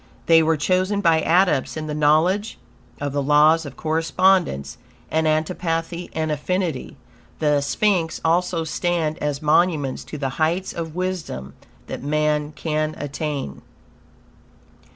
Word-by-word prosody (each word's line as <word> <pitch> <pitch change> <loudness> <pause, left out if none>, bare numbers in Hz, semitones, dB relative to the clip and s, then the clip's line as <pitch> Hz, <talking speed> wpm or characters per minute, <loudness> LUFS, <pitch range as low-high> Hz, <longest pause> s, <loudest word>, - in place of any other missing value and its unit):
They 165 -1 +6
were 160 0 +2
chosen 185 +6 +1
by 165 -3 +3
Adepts 165 -5 +2
in 155 - -4
the 150 - -4
knowledge 160 +8 +2 0.4
of 145 -1 -3
the 145 - 0
Laws 150 +3 +4
of 135 - -11
Correspondence 165 - +1 0.3
and 160 0 +1
antipathy 165 +2 -1
and 160 -1 -1
affinity. 175 +3 -2 0.4
The 150 -2 +2
sphinx 165 +3 0
also 170 0 +1
stand 160 -1 -1
as 145 0 -2
monuments 150 -3 +2
to 150 - -7
the 135 -2 -2
heights 170 +4 0
of 165 -1 -5
wisdom 175 - -4 0.3
that - - -6
man 150 +1 0
can 155 +1 -2
attain. 145 - -4
160 Hz, 130 wpm, -22 LUFS, 150-175 Hz, 0.4 s, They